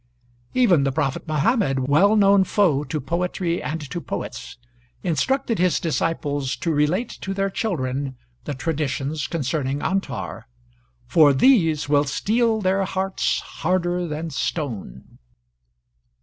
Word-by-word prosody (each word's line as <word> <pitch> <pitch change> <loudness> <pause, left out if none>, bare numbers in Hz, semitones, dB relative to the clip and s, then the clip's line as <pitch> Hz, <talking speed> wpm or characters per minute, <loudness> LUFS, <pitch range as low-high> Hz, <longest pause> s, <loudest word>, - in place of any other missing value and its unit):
Even 195 - +4
the 135 - +1
prophet 135 +2 -2
Muhammad, 155 - +1
well 190 +10 +4
known 200 -2 +5
foe 175 -8 +2
to 150 +2 -3
poetry 170 +4 -2
and 150 -1 -4
to 175 - -3
poets, - - -6 0.5
instructed 225 - 0
his 180 -1 +2
disciples 145 -4 -1
to 165 - -2
relate 155 +11 +1
to 195 0 -4
their 195 0 0
children 135 - -2 0.3
the 145 - -3
traditions 150 0 -2
concerning 140 -3 -2
Antar, 195 0 -3 0.6
"for 145 +3 +5
these 160 - +3
will 145 0 +3
steel 220 - +1
their 195 0 +1
hearts 190 0 -1
harder 175 0 -1
than 160 +1 -4
stone." 120 - -4
165 Hz, 120 wpm, -23 LUFS, 145-190 Hz, 0.6 s, known